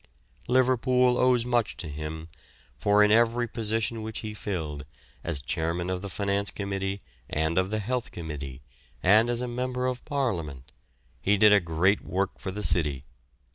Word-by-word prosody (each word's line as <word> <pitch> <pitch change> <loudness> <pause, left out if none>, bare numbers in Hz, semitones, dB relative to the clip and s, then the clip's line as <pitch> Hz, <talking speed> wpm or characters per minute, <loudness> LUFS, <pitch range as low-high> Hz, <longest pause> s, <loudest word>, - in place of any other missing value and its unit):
Liverpool 125 0 +3
owes 125 -2 +3
much 120 -2 0
to 85 - -4
him, 75 +2 -6 0.5
for 105 +9 +4
in 105 - +4
every 120 +2 +3
position 115 0 -2
which 110 0 -5
he 110 -1 -5
filled, 80 -8 -4 0.4
as 85 -4 -2
Chairman 85 +6 -2
of 90 -1 -2
the 100 - -5
Finance 100 +1 0
Committee 100 -1 -3 0.3
and 80 +2 0
of 95 0 0
the 110 - -1
Health 125 +4 -2
Committee, 70 -5 -7 0.4
and 110 +5 +5
as 120 0 0
a 125 - -2
Member 125 +1 -2
of 125 -1 -2
Parliament, 85 - -3 0.5
he 100 +1 +3
did 105 +1 +7
a 105 - +7
great 90 +3 +1
work 95 +2 -2
for - - -5
the 105 +3 -4
city. 75 -8 +2
100 Hz, 165 wpm, -27 LUFS, 85-120 Hz, 0.5 s, did